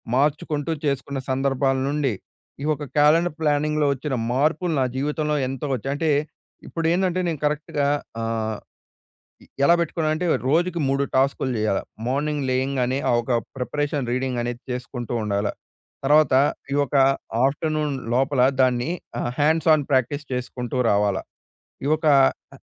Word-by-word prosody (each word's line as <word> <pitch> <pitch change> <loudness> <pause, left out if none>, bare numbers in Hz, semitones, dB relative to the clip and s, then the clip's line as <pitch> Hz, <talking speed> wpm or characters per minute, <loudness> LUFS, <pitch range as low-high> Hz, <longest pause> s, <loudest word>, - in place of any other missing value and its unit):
మార్చుకుంటూ 145 +2 0
చేసుకున్న 140 0 -1
సందర్భాల 135 0 +1
నుండి 145 -4 0 0.5
ఈ - - -2
ఒక 150 - -6
క్యాలెండర్ 155 +2 +4
ప్లానింగ్‌లొ 150 0 +1
వచ్చిన 140 +1 -3 0.2
మార్పులు 160 +5 +1
నా 130 - +3
జీవితంలో 150 +2 -1
ఎంతో 135 +2 -4
వచ్చాయి. 135 +2 -2
అంటే, 160 +1 0 0.6
ఇప్పుడు 165 -1 -4
ఏందంటే 185 0 +1
నేను 160 -4 -2
కరెక్ట్‌గా 150 -1 0 0.3
ఆహ్, 110 -1 -2 0.8
ఇ - - -17 0.2
ఎలా 170 - +6
పెట్టుకున్నానంటే 160 0 0 0.2
రోజుకి 170 +3 +1
3 135 +1 +1
టాస్కులు 135 0 +1
చేయాల. 105 -2 +1 0.3
మార్నింగ్ 145 +2 -1
లేయింగానే 130 0 0
ఆ! - - +4
ఒక 130 - -3 0.3
ప్రిపరేషన్ 145 0 -2
రీడింగ్ 130 -1 -1
అనేది 120 0 -4
చేసుకుంటూ 125 -1 -5
ఉండాల. 100 0 0 0.6
తర్వాత 150 0 +5 0.4
ఈ - - +1
ఒక 140 - -6 0.5
ఆఫ్టర్నూన్ 150 0 -1 0.2
లోపల 135 0 +2 0.2
దాన్ని 125 0 +2 0.3
ఆహ్, 120 - -2
హ్యాండ్స్ 160 +2 +3
ఆన్ 145 -3 -2
ప్రాక్టీస్ 140 +2 +1
చేసుకుంటూ 125 0 -4
రావాలా. 100 -1 +1 0.6
ఈ - - 0
ఒక 155 - -5 0.5
అ - - -14
140 Hz, 135 wpm, -23 LUFS, 130-150 Hz, 0.8 s, ఎలా